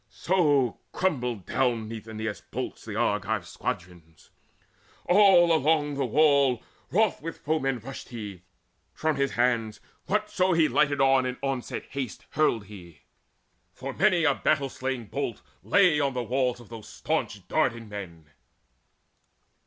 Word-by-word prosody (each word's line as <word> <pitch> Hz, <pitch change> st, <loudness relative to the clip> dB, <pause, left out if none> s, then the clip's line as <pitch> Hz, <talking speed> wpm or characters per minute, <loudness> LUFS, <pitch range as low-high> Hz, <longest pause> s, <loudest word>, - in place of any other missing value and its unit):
So 145 Hz, -9 st, +1 dB
crumbled 125 Hz, -, -1 dB
down 120 Hz, -4 st, 0 dB
beneath 110 Hz, -1 st, -8 dB
Aeneas' 110 Hz, -3 st, -5 dB
bolts -, -, -6 dB
The -, -, -6 dB
Argive -, -, 0 dB
squadrons. 85 Hz, -3 st, -7 dB, 0.7 s
All 180 Hz, -3 st, +6 dB
along 150 Hz, -1 st, +2 dB
the 140 Hz, -2 st, -1 dB
wall 140 Hz, -2 st, +3 dB, 0.3 s
Wroth 215 Hz, +1 st, +2 dB
with 165 Hz, +2 st, -5 dB
the -, -, -30 dB
foeman 135 Hz, -4 st, 0 dB
rushed 130 Hz, +4 st, -9 dB
he: 105 Hz, -7 st, -7 dB, 0.5 s
from 155 Hz, -1 st, 0 dB
his 140 Hz, -1 st, 0 dB
hands 120 Hz, -3 st, +1 dB, 0.3 s
Whatso 195 Hz, -3 st, +1 dB
he 165 Hz, -2 st, +4 dB
lighted 145 Hz, -2 st, +2 dB
on 135 Hz, -1 st, +4 dB
in 125 Hz, -, -4 dB
onslaught 135 Hz, -3 st, -3 dB
haste 135 Hz, -5 st, -5 dB
Hurled 120 Hz, -9 st, +1 dB
he; 90 Hz, -6 st, -13 dB, 0.7 s
for 135 Hz, +1 st, -6 dB
many 185 Hz, -2 st, +3 dB
a 150 Hz, -3 st, +4 dB
battle 140 Hz, -1 st, +1 dB
staying 130 Hz, -2 st, -4 dB
bolt 100 Hz, -, -4 dB, 0.2 s
Lay 180 Hz, -7 st, +4 dB
on 140 Hz, -2 st, 0 dB
the 125 Hz, -, -1 dB
walls 125 Hz, +1 st, 0 dB
of 120 Hz, -, -15 dB
those 110 Hz, -2 st, -10 dB
staunch -, -, -3 dB
Dardan 115 Hz, -1 st, 0 dB
men. 90 Hz, -6 st, -8 dB
130 Hz, 140 wpm, -27 LUFS, 115-155 Hz, 0.7 s, All